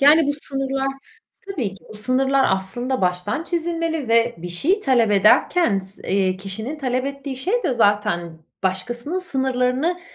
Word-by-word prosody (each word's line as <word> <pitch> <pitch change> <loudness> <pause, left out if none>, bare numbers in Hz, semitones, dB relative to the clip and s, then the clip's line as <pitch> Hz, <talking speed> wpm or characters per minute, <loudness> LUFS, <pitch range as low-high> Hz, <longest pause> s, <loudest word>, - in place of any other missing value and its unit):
Yani, 295 +2 +6
bu 285 - +2
sınırlar 270 0 -2 0.6
Tabii 255 - -3
ki. 185 -5 -18
Bu - - -11
sınırlar 265 +5 +2
aslında 245 +7 -3
baştan 180 - 0
çizilmeli 330 -4 -2
ve 230 +1 +3
bir 175 +2 -6
şey 320 - +1
talep 245 - +3
ederken 210 - +4
s 190 +1 -11
eee, 190 -1 +2
kişinin 220 +10 -5
talep 255 -2 -1
ettiği 275 -1 -5
şey 385 - 0
de - - +1
zaten 205 -7 +1 0.2
başkasının 240 - -2
sınırlarını 265 +1 0
255 Hz, 150 wpm, -22 LUFS, 200-285 Hz, 0.6 s, Yani